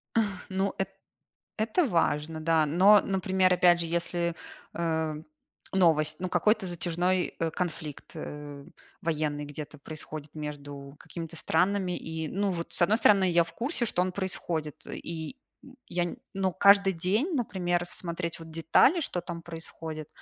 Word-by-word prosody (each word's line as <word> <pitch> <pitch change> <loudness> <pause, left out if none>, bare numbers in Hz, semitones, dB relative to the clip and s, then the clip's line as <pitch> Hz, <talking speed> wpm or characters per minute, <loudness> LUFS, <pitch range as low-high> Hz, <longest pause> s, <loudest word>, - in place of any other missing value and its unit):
Ах, 205 -4 0
ну 190 +1 0
эт - - -1 0.7
это 225 +11 +2
важно, 160 - 0
да. 160 -1 +3
Но, 190 +7 +7
например, 190 -1 +2
опять 175 -1 +5
же, 170 - -1
если, 170 0 -1 0.4
эм, 160 -2 -1 0.5
новость, 160 -5 +3
ну, 185 - -2
какой-то 205 +3 +2
затяжной, 175 +1 0
э, 165 -1 0
конфликт, 155 -4 -5
э, 145 -1 -7 0.4
военный 150 -2 -1
где-то 150 +1 -8
происходит 155 0 -8
между 145 -2 -7
какими-то 165 -1 -7
странами. 180 +3 +1
И, 160 0 -4
ну, 200 +3 0
вот, 170 -2 -4
с - - +2
одной 215 +6 +4
стороны, 195 -5 +5
я 170 -1 +4
в 165 - -13
курсе, 245 - 0
что 180 - +1
он 185 - 0
происходит. 170 -6 -3
И, 165 - -6 0.3
м, 270 -1 -15
я 175 0 0
не, 175 - -4 0.2
ну, 190 -1 0
каждый 200 0 +6
день, 210 - 0
например, 175 -6 0
смотреть 170 -1 -3
вот 165 0 -10
детали, 165 - +4
что 180 - -2
там 170 -1 -6
происходит, 160 -2 -7
170 Hz, 150 wpm, -28 LUFS, 160-190 Hz, 0.7 s, Но